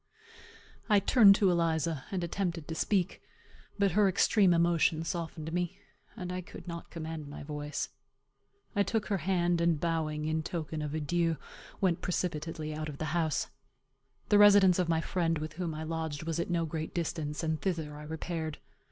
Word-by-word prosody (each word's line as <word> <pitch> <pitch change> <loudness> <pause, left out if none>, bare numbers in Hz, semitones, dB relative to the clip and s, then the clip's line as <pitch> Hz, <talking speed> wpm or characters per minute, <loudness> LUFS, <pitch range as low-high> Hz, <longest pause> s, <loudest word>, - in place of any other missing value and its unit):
I 210 -1 +6
turned 200 0 +7
to 195 -2 +3
Eliza, 165 -3 0
and 185 -3 -2
attempted 170 -2 -2
to 160 - -4
speak; 185 +2 0 0.6
but 200 -2 +3
her 200 +2 +4
extreme 195 +1 +4
emotion 170 -1 +3
softened 160 -1 -4
me, 180 +2 -1 0.4
and 180 -4 -4
I 185 - -3
could 180 - -12
not 170 -1 -6
command 160 -2 -6
my 145 - -8
voice. 150 0 -4 0.9
I 205 - +3
took 215 +1 0
her 200 -2 +1
hand, 175 0 +1
and 170 -3 +2
bowing, 155 -2 -1
in 160 +1 0
token 155 -1 -4
of 150 0 -3
an 155 - -2
adieu, 165 +1 +1 0.4
went 180 -4 +2
precipitately 165 -3 -2
out 155 0 -4
of 145 - -7
the 155 -1 -3
house. 160 -4 0 0.8
The 205 - +6
residence 200 -3 +7
of 180 -2 +1
my 160 -1 +2
friend, 165 -2 0
with 155 +1 -5
whom 165 -1 -3
I 155 - -4
lodged, 160 -2 -3
was 165 0 -2
at 170 - -2
no 170 -1 +1
great 160 0 -5
distance, 160 -2 -2
and 160 -2 -1
thither 160 -6 -2
I 150 - -9
repaired. 160 0 -4
165 Hz, 180 wpm, -31 LUFS, 155-180 Hz, 0.9 s, turned